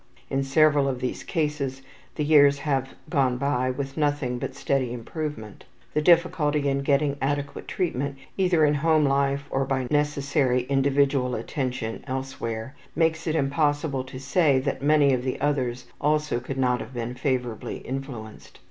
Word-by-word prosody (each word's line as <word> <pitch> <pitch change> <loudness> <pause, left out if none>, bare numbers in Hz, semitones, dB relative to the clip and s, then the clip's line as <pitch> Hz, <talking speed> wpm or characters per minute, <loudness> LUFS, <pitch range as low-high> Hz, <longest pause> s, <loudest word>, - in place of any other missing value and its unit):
In 135 - +1
several 145 0 +4
of 130 -2 -2
these 125 - -3
cases 150 -5 -2 0.3
the 150 - -1
years 145 -2 +6
have 135 -2 -2
gone 135 -6 +1
by 130 -1 0
with 135 +2 -4
nothing 145 -5 0
but - - -5
steady 130 -3 0
improvement. 125 -2 -6 0.3
The 150 - +1
difficulty 155 -3 +3
in 140 0 +1
getting 140 0 +1
adequate 145 +1 -2
treatment, 140 -6 -2 0.2
either 180 -5 +3
in 150 - +3
home 155 +1 +3
life 140 0 +1
or 135 - +1
by 135 -1 -1
the 125 - -5
necessary 140 -3 +1
individual 135 -1 +2
attention 125 -1 -3
elsewhere, 130 -3 -4 0.2
makes 165 0 +1
it 160 - 0
impossible 145 -1 0
to 130 0 -8
say 140 +1 +3
that 140 0 -2
many 145 -1 +4
of 125 - +1
the 130 0 -3
others 130 -4 -1 0.2
also 150 -3 +1
could 135 +2 -6
not 125 -2 +2
have 125 +4 -8
been 120 0 -3
favorably 125 -3 -2
influenced. 130 -5 -7
140 Hz, 155 wpm, -25 LUFS, 130-150 Hz, 0.3 s, years